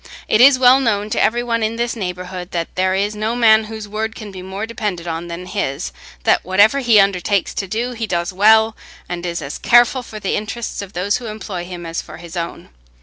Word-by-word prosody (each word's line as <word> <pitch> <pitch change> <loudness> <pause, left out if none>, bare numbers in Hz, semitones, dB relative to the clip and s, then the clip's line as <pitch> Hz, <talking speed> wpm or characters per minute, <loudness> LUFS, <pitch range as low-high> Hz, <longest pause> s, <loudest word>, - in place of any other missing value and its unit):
It 215 - +3
is 270 +1 +8
well 255 +1 +6
known 215 -5 0
to - - +1
every 240 +2 +2
one 230 -1 -1
in 220 +1 0
this 235 +1 -2
neighbourhood 180 -2 -5
that 170 -3 -4
there 185 0 +1
is 200 +2 0
no 215 +2 -2
man 220 -2 +5
whose 220 -1 -7
word 220 +2 -3
can 215 -3 -8
be 185 -1 -8
more 190 +3 -5
depended 210 -7 -4
on 165 +1 -4
than 170 +1 -6
his; 160 -8 -3 0.3
that - - +3
whatever 205 +8 +4
he 235 -5 +5
undertakes 195 0 +1
to 195 - -3
do, 230 +6 -2
he 230 -2 -4
does 175 -1 -2
well, 220 +3 +5 0.3
and 175 0 -4
is 170 -2 -3
as 140 +2 -6
careful 240 +2 +4
for 220 -3 -9
the 195 - -1
interests 215 +2 -4
of 200 0 -9
those 200 +3 0
who 245 - -8
employ 210 -5 -6
him 175 -1 -8
as 165 +1 -3
for - - -11
his 170 +1 -10
own. 170 -1 -5
205 Hz, 225 wpm, -19 LUFS, 180-225 Hz, 0.3 s, is